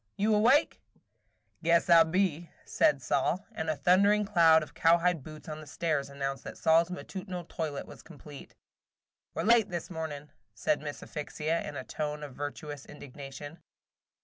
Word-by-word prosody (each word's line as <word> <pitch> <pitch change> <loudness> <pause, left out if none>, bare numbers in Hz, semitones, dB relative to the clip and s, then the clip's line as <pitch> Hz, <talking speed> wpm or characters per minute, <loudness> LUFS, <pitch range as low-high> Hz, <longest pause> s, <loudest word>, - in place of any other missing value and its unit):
Sol! - - -48
You 210 +2 +2
awake?" 245 +8 +3 0.8
"Guess 170 0 +3
I 170 -1 +8
be," 170 -1 0 0.2
said 140 -3 +2
Sol; 145 +9 0
and 160 -7 -4
a 155 - +1
thundering 200 +6 +4
sound 165 -5 +5
of 155 - -12
cowhide 170 0 +3
boots 155 +3 -11
on 155 0 -6
the 155 - -12
stairs 145 -2 -1
announced 135 -1 -4
that - - -8
Sol's 165 +1 +3
matutinal 185 0 -6
toilet 155 -4 -4
was - - -13
complete. 145 -3 -13 0.8
"We - - -2
're - - -3
late 230 -2 +4
this 175 0 -5
morning," 155 -3 -6 0.2
said 145 - 0
Miss 145 -1 -6
Asphyxia, 155 +1 -3
in 145 - -9
a 130 - -5
tone 150 +2 -4
of 145 -3 -8
virtuous 145 0 -6
indignation. 145 +2 -10
160 Hz, 165 wpm, -30 LUFS, 145-175 Hz, 0.8 s, I